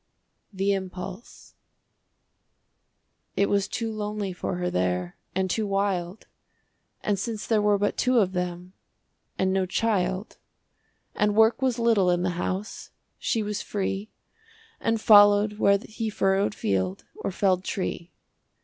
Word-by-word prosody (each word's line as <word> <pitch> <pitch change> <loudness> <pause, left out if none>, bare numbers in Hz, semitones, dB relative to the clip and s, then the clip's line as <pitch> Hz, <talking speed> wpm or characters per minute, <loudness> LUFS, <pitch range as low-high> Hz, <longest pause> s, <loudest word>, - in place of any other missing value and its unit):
THE 195 0 0
IMPULSE 190 +2 -7 1.8
It 200 - +2
was 200 -1 +1
too 230 -2 -3
lonely 210 -2 -3
for 180 - -3
her 180 0 -2
there, 90 -1 -1 0.2
And 190 0 +1
too 210 +3 -1
wild, 195 -1 -1 0.8
And 205 -2 0
since 220 0 -4
there 220 -2 +2
were 205 0 +3
but 205 +1 -1
two 255 0 +3
of 195 -5 +3
them, 180 0 -4 0.6
And 190 0 +1
no 190 -1 +1
child, 190 -1 -1 0.7
And 210 0 +1
work 220 +3 +4
was 255 -2 +1
little 225 -6 +3
in 175 0 +1
the 180 - +1
house, 185 +4 -4 0.3
She 225 -3 0
was 210 0 -3
free, 200 +1 -3 0.7
And 225 0 0
followed 205 0 +6
where 200 -1 +5
he 220 +2 -5
furrowed 195 0 +1
field, 95 -1 -1
Or - - -3
felled 185 -1 +1
tree. 180 -3 -4
200 Hz, 135 wpm, -26 LUFS, 185-210 Hz, 1.8 s, followed